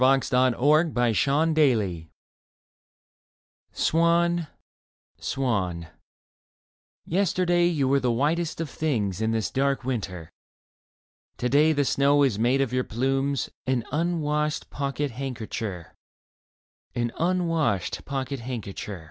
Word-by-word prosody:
26 135 +1 +3
Leda 125 -1 +4
VARIATIONS 140 - +2
ON 160 +2 +3
A - - 0 0.2
THEME 90 -7 -3 1.6
SWAN, 170 0 +2 0.7
Swan, 95 -11 -2 1.2
Yesterday 175 -1 +2
you 150 -6 +1
were 140 +1 +3
The 125 -2 +1
whitest 155 +8 0
of 165 - -2
things 110 - -2
in 110 - +1
this 110 -3 -1
dark 135 0 0
winter. 95 -10 -4 1.1
To 125 - -1
day 150 +4 +4
the 145 -2 +1
snow 140 +2 +3
has 120 -7 +1
made 125 +4 +2
of 130 -3 -1
your 130 0 +1
plumes 135 +4 -1 0.2
An 125 -3 0
unwashed 150 -2 -1
pocket 140 0 -2
handkercher, 110 -8 -5 1.0
An 120 -1 -1
unwashed 165 - 0
pocket 135 -1 -4
handkercher 105 -5 -6
135 Hz, 115 wpm, -25 LUFS, 115-155 Hz, 1.6 s, Leda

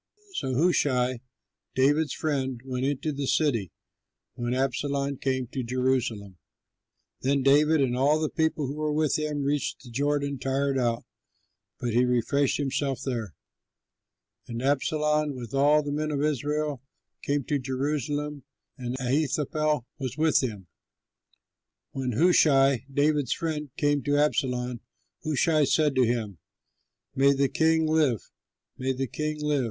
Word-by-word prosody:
So 130 - -2
Hushai, 130 -6 +2 0.6
David's 145 +4 +2
friend, 135 -5 -2
went 130 0 -2
into 145 +2 -1
the 140 -1 -3
city, 120 - +1 0.6
when 120 +1 -2
Absalom 140 +1 -1
came 130 -1 -1
to 130 - -3
Jerusalem. 120 -6 -1 0.8
Then 135 +1 +1
David 150 +3 +4
and 125 -2 +1
all 145 +4 +3
the 155 - 0
people 160 -2 0
who 140 +3 -5
were 155 0 -1
with 155 0 +1
him, 150 -2 -2
reached 145 +1 -1
the 120 - -12
Jordan 140 +1 -1
tired 135 +1 0
out, 120 -2 0 0.8
but 120 -2 -2
he 120 +2 +4
refreshed 125 +3 +1
himself 135 -2 -1
there. 115 - -3 1.1
And 115 -1 -5
Absalom, 150 +1 +1
with 120 -2 -8
all 145 +2 +4
the 145 - -4
men 155 +1 -1
of 145 -1 -1
Israel, 150 -1 -1 0.4
came 145 0 0
to 145 +3 -1
Jerusalem, 145 +2 -2 0.4
and 125 0 -3
Ahithophel 150 +1 0
was 130 -1 -4
with 160 0 +3
him. 105 -7 -4 1.3
When 130 -2 -3
Hushai, 135 -3 +4
David's 145 -1 +2
friend, 155 -3 -3
came 145 -1 +2
to 145 0 +2
Absalom, 125 -4 0 0.4
Hushai 155 0 +2
said 150 +1 +2
to 130 -3 +3
him, 110 -7 -2 0.7
"May 140 +1 +4
the 140 0 +1
king 160 0 +2
live, 155 - +1 0.5
may 130 +1 0
the 135 +1 -2
king 150 +3 -3
live!" 150 -1 +1
140 Hz, 135 wpm, -27 LUFS, 130-150 Hz, 1.3 s, David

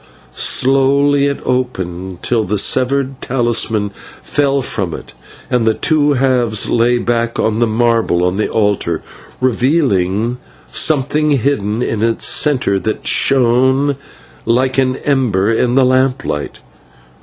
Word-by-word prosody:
Slowly 140 +2 +2
it 140 - -3
opened, 95 -8 -3
till 115 -3 +1
the 105 +1 -2
severed 130 +4 0
talisman 115 -4 0 0.3
fell 140 -2 0
from 95 -9 -3
it, - - -11 0.3
and 120 -2 0
its 110 - 0
two 150 -2 +2
halves 125 -5 +1
lay 120 +1 +2
back 120 -1 -1
on 110 0 0
the 120 - +2
marble 110 -6 +1
of 90 - -2
the 105 - -1
altar, 100 -7 -1 0.4
revealing 120 - 0 0.3
something 150 +1 +1
hidden 125 -5 0
in 110 -3 -3
its 115 0 0
centre 130 -10 +1
that 110 +4 -4
shone 130 +2 +2 0.5
like 130 +3 +1
an 130 -1 +1
ember 115 -8 +1
in 120 +2 0
the 135 -1 +4
lamplight. 130 - -1
120 Hz, 125 wpm, -15 LUFS, 110-135 Hz, 0.5 s, the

